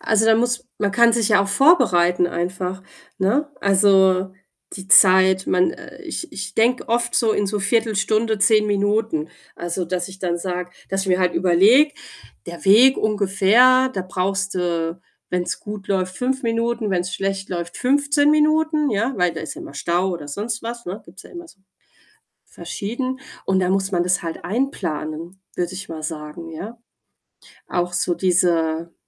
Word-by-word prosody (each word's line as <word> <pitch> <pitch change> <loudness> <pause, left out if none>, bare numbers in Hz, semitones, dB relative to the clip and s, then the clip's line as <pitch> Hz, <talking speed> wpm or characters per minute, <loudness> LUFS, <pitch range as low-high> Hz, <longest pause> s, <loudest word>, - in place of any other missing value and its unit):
Also, 220 0 +1
da 225 - +5
muss 245 +2 -1
man 205 -1 0
kann 235 +2 +4
sich 230 -2 +1
ja 205 -2 +4
auch 200 - -4
vorbereiten 185 - +3
einfach, 180 +2 -4 0.4
ne? 255 +11 +1
Also, 190 -1 +3 0.4
die 190 0 -9
Zeit, 190 -1 +5
man 180 0 +1 0.3
ich 335 0 -6
ich 195 0 -7
denke 240 +2 +1
oft 235 +1 0
so 225 -3 +2
in 205 - 0
so 210 +1 -2
1/4 220 +2 0
Stunde, 220 +1 0
10 210 +1 +3
Minuten. 205 -5 0 0.3
Also, 175 +1 -3
dass 180 +1 -3
ich 190 0 -12
dann 175 -2 -2
sage 180 0 -4 0.2
dass 195 0 -1
ich 190 - -5
mir 180 0 +2
halt 180 -1 +1
überlege: 210 - +4 0.5
„Der 170 0 -9
Weg 235 +7 +6
ungefähr, 215 +5 +3
da 190 - -3
brauchst 195 +2 -2
du, 170 -1 -2 0.3
wenn's 180 -1 -3
gut 205 -1 -8
läuft, 185 -2 -1
5 265 +2 -2
Minuten, 230 -2 -1
wenn's 180 0 -2
schlecht 195 0 -3
läuft, 170 -1 -5
15 285 +2 +2
Minuten“, 305 -1 +2
ja, 225 +6 0
weil 180 -2 +1
da - - -6
ist 160 - -6
ja - - -10
mal 140 - -10
Stau 175 +6 -1
oder 165 -5 -6
sonst 210 +9 -4
was, 235 +1 -7
ne, 185 +4 -6
gibt's 185 +4 -15
ja - - -16
immer 345 -1 -10
so 195 - -20 0.8
verschieden 255 +5 -5 0.3
und 190 -1 +2
dann 185 0 +1
muss 195 0 0
man 175 -2 0
das 180 0 0
halt 165 -1 -6
einplanen, 175 - -4 0.2
würde 175 +1 -2
ich 195 +1 -8
mal 160 -1 -7
sagen, 155 +2 -7
ja. 210 +9 -8 0.9
Auch 175 0 -2
so 175 0 0
diese, 170 -2 0
195 Hz, 170 wpm, -21 LUFS, 180-230 Hz, 0.9 s, Weg